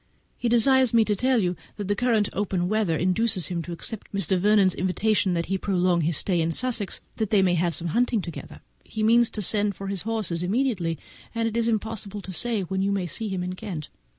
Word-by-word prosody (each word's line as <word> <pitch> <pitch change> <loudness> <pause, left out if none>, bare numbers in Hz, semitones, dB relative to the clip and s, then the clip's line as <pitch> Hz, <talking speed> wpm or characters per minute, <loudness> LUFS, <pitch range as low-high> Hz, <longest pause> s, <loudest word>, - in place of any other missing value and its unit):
He 240 - -2
desires 255 +1 +4
me 225 -1 +5
to 210 - +1
tell 255 +4 +2
you 180 -4 +1 0.2
that 205 -2 -4
the 205 - +1
present 225 -2 +2
open 190 -3 -1
weather 205 -5 +1
induces 185 +1 +1
him 175 -2 -2
to 175 - -8
accept 200 +5 -5
Mr. 190 -2 +1
Vernon's 200 -1 +4
invitation 185 0 +1
to 190 +3 -1
prolong 180 -3 +1
his 160 -1 +1
stay 180 -4 +1
in 165 +1 0
Sussex, 230 0 -1 0.2
that 220 -3 -1
they 200 -3 +4
may 180 -2 +3
have 170 -1 +1
some 170 0 -3
hunting 235 +4 +1
together. 170 - -8 0.2
He 215 - -4
means 235 +1 +5
to 210 - -4
send 205 +1 +1
for 195 0 -6
his 195 -3 -3
horses 215 -7 -2
immediately, 190 - 0 0.4
and 230 0 0
it 225 - -4
is 230 -1 +1
impossible 215 -2 -3
to 190 - -7
say 225 +3 0
when 190 +1 -2
you 200 +1 +1
may 195 -2 -1
see 210 +6 -3
him 185 -2 -2
in 180 0 -3
Kent. 185 -6 -6
200 Hz, 220 wpm, -25 LUFS, 180-225 Hz, 0.4 s, me